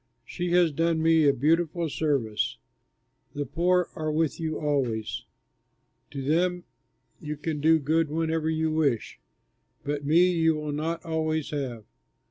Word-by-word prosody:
She 175 +7 -4
has 175 -2 +4
done 165 +2 +1
me 160 -2 +4
a - - +7
beautiful 165 +5 +1
service. 135 -9 -1 0.8
The 145 0 -2
poor 175 +5 +1
are 155 -1 -2
with 155 0 0
you 160 -1 -2
always; 130 -8 -1 0.8
to 140 -2 -6
them 175 +5 +1 0.6
you 150 -2 -5
can 150 0 -3
do 160 +2 +5
good 160 +1 +1
whenever 160 0 -1
you 160 0 0
wish, 145 -8 0 0.6
but 145 0 -3
me 170 +5 +4
you 160 -2 +2
will 150 -1 -4
not 160 +3 -3
always 160 -2 -1
have. 125 -7 -4
155 Hz, 140 wpm, -27 LUFS, 145-165 Hz, 0.8 s, a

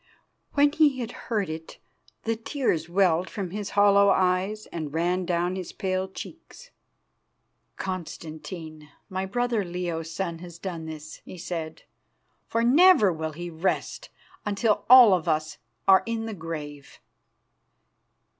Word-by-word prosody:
When 285 0 +4
he 300 -3 +3
had 240 -2 -4 0.2
heard 210 -5 0
it, 160 +1 -7 0.5
the 225 0 0
tears 225 - -1
welled 180 -1 +2
from 195 -5 -5
his 205 0 -4
hollow 200 0 +6
eyes 190 +3 +1
and 155 -4 -4
ran 175 +3 0
down 175 +1 0
his 185 -2 -5
pale 185 0 -2
cheeks. 335 - -11 1.1
"Constantine, 160 -3 -7 0.2
my 190 0 -3
brother 240 +1 0
Leo's 175 -2 -4
son, 170 0 -4
has 175 -1 -10
done 170 -3 -6
this," 155 -1 -8
he - - -10
said, 165 -2 -5 0.6
"for 230 0 0
never 260 - +6
will 160 -1 -4
he 175 +2 -6
rest 165 +4 -2 0.3
until 210 +1 0
all 250 -5 +10
of 175 -2 0
us 155 -1 -1 0.3
are 190 -1 +7
in 225 -1 -2
the 225 - -4
grave." 150 -5 -7
185 Hz, 135 wpm, -26 LUFS, 165-210 Hz, 1.1 s, all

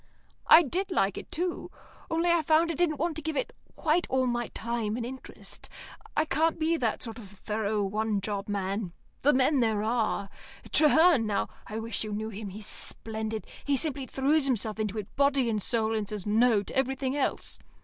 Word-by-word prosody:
"I 335 - +9
did 365 +7 -2
like 200 - +1
it, - - -8
too. 350 +1 -2 0.4
Only 335 +2 +2
I 340 -1 +4
found 320 +1 +3
I - - -2
didn't 330 -2 +1
want 330 +2 -1
to - - -3
give 315 -1 -3
it - - -2 0.2
quite 335 +2 +1
all 260 0 +2
my 240 -1 -1
time 230 -1 -3
and 235 - -3
interest. 260 +2 -9 0.5
I 310 - +3
can't 320 +3 +1
be 325 +1 +1
that 235 -8 -1
sort 225 -1 -5
of 205 -4 -11
thorough, 210 +1 -2
one 210 +1 0
job 200 0 -3
man. 195 -2 -2 0.3
The 290 - +5
men 265 +1 +3
there 220 -3 +1
are. 220 -3 0 0.4
Traherne, 310 -5 +5
now 205 - 0 0.2
I 215 - -5
wish 225 -1 -2
you 215 -1 -4
knew 215 +1 -3
him; 210 -1 -6
he's 205 +2 -9
splendid. 220 0 -5 0.2
He 285 -1 +1
simply 275 -3 -1
throws 280 +3 +2
himself 220 -4 -1
into 215 0 -2
it 205 -3 -6
body 275 -3 +3
and 215 -1 -1
soul, 225 +1 +2
and 215 -2 -2
says 210 -3 -5
no 220 0 +3
to - - -8
everything 265 0 0
else. 285 - -1
235 Hz, 195 wpm, -28 LUFS, 215-295 Hz, 0.5 s, I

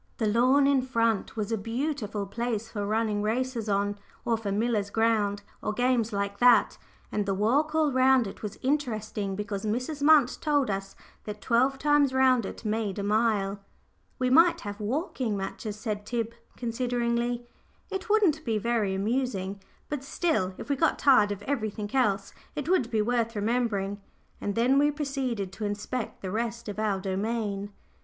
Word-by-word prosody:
The 225 - 0
lawn 250 +6 +4
in 275 -1 +4
front 230 -5 0
was 215 0 -2
a 225 - 0
beautiful 225 -2 -2
place 225 +1 -3
for 205 -3 -3
running 215 -1 0
races 230 +1 -1
on, 205 0 0 0.3
or 235 - +2
for 220 -3 -3
"Miller's 210 -1 0
ground," 210 -2 +1 0.2
or 215 - -2
games 245 -1 +1
like 200 0 -2
that 245 -1 +5 0.3
and 205 -1 -1
the 195 - +1
walk 280 +10 +2
all 310 -2 +3
round 260 -1 +4
it 195 - -8
was 210 -2 -5
interesting 220 -8 -1
because 205 -1 -4
Mrs. 255 +7 -2
Munt 290 -4 +5
told 290 -7 +1
us 195 0 -4 0.3
that 210 0 -6
twelve 255 +5 +2
times 290 -1 +3
round 255 -5 +4
it, - - -9
made 215 -2 -1
a 200 - -2
mile. 205 -2 +1 0.6
"We 255 -1 0
might 335 +5 +5
have 205 0 -6
walking 240 - -2
matches," 200 +2 -5
said 215 -2 -3
Tib, 230 +1 -3 0.2
consideringly. 240 0 -1 0.5
"It 385 +3 -4
wouldn't 380 -8 +3
be 225 -5 0
very 215 -3 0
amusing; 200 -2 -1 0.3
but 295 -3 -4
still, 275 - 0
if - - -8
we 280 - +1
got 325 - +2
tired 255 -8 +5
of 205 0 -5
everything 215 -6 -3
else, 200 -6 +1 0.2
it 295 -1 -4
would 340 -10 +2
be 220 -3 +1
worth 230 0 0
remembering;" 205 -2 -1 0.4
and 205 - -2
then 250 +4 +4
we 290 +1 +4
proceeded 270 -9 -2
to 210 +2 -4
inspect 205 +4 -4
the 185 - -3
rest 230 +2 -3
of 205 0 -5
our 210 -3 0
domain. 200 +1 -2
230 Hz, 170 wpm, -28 LUFS, 205-255 Hz, 0.6 s, that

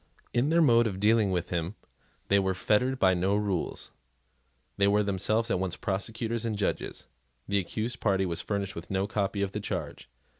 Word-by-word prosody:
In 125 +5 +2
their 165 +1 +4
mode 120 -4 +5
of 95 -3 -4
dealing 105 0 +4
with 90 -2 -1
him 85 +3 -2 0.5
they 100 - +4
were 95 -1 0
fettered 125 +8 +1
by 95 -5 +4
no 95 +3 +1
rules. 100 -5 -2 0.9
They 100 - +4
were 105 +1 +3
themselves 110 +4 +1
at - - +1
once 95 -2 -2
prosecutors 110 +2 -2
and 110 -3 -2
judges. 100 - -2 0.4
The 100 0 +2
accused 110 +7 -3
party 95 -2 +2
was 85 -2 -2
furnished 100 -2 -3
with 85 0 -8
no 95 0 0
copy 100 -1 -1
of 95 - -2
the 105 - -3
charge. 100 - -5
100 Hz, 185 wpm, -28 LUFS, 95-110 Hz, 0.9 s, mode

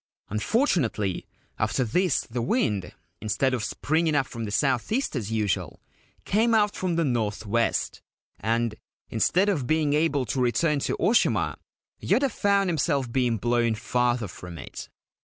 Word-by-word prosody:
Unfortunately, 110 - 0 0.3
after 110 +4 +1
this 175 - +1
the 120 +1 -4
wind, 115 - 0 0.3
instead 125 +5 0
of 120 -4 -1
springing 155 +7 0
up 140 -2 +2
from 115 -2 -6
the 105 - -5
south 125 - +1
east 255 - 0
as 110 -4 -3
usual, 105 -5 -1 0.5
came 225 +3 +3
out 210 -1 +3
from 180 -2 -1
the 165 -1 +1
north 110 -5 -1
west, 115 +3 0 0.4
and, 115 +1 0 0.4
instead 180 - +2
of 155 -12 0
being 155 -1 +2
able 150 -3 +1
to 125 +4 -1
return 145 +5 +2
to - - -2
Oshima, 230 +4 +2 0.4
Yoda 275 -1 +2
found 200 -1 +2
himself 140 -6 0
being 125 -2 +1
blown 120 +1 +1
farther 120 0 0
from 90 -1 -9
it. - - -8
125 Hz, 150 wpm, -26 LUFS, 115-165 Hz, 0.5 s, came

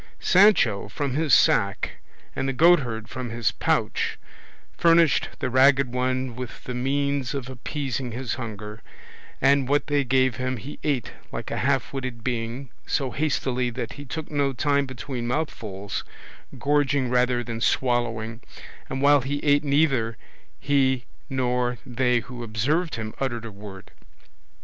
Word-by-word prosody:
Sancho 185 - +4
from 140 +4 -2
his 155 +1 0
sack, - - +3 0.4
and 135 - -1
the - - -1
goatherd 125 -8 +3
from 130 -2 -5
his 115 0 0
pouch, - - 0 0.6
furnished 165 -2 +4
the - - -2
Ragged 130 0 +4
One 130 -1 -1
with 125 -1 -7
the 125 - -5
means 140 +1 -1
of 135 -3 -4
appeasing 130 -1 -4
his 125 +2 -3
hunger, 105 -3 -7 0.6
and 140 -1 +4
what 145 +2 +2
they 145 -1 +1
gave 130 -1 +2
him 130 0 -2
he 135 +7 -9
ate 135 -7 -1 0.2
like - - -5
a - - -2
half 135 0 0
witted 130 -4 -5
being, 120 +2 -3 0.2
so 135 -3 0
hastily 130 -4 0
that 115 +1 -5
he 145 - -9
took 155 +3 -6
no 140 -2 +1
time 140 +1 +1
between 120 0 -5
mouthfuls, 110 -8 -3 0.5
gorging 140 -3 +1
rather 125 0 +2
than 115 -1 -5
swallowing; 115 -3 0 0.5
and 135 +1 -3
while 145 0 +6
he 140 +3 -2
ate 145 0 +4
neither 140 -6 +2 0.4
he 130 -3 +2 0.2
nor 125 -2 0
they 125 -1 +1
who 125 0 -9
observed 130 +10 0
him 110 -1 -5
uttered 120 -4 -2
a 115 - -7
word. 100 -1 -11
130 Hz, 145 wpm, -25 LUFS, 120-140 Hz, 0.6 s, while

